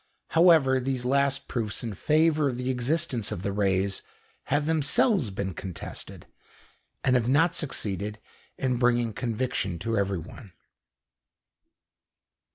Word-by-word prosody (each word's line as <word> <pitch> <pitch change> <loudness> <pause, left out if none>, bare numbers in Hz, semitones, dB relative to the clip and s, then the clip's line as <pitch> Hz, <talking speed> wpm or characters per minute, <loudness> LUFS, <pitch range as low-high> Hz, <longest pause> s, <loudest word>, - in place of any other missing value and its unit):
However, 160 -6 +5
these 130 -1 -2
last 140 +1 +1
proofs 110 -3 -3
in 115 -3 -4
favour 155 - +2
of 125 - -4
the 125 +1 -1
existence 125 -3 0
of 100 -3 -5
the 100 - -1
rays 95 -1 0 0.4
have 145 +1 0
themselves 160 - +2
been 95 -1 -4
contested, 90 +1 -7 0.8
and 130 - +3
have 120 -1 +1
not 160 +6 +4
succeeded 105 - -2 0.4
in 130 -2 0
bringing 120 -2 +2
conviction 115 -6 -2
to 115 +7 -2
everyone. 95 +1 -4
125 Hz, 120 wpm, -27 LUFS, 100-140 Hz, 0.8 s, However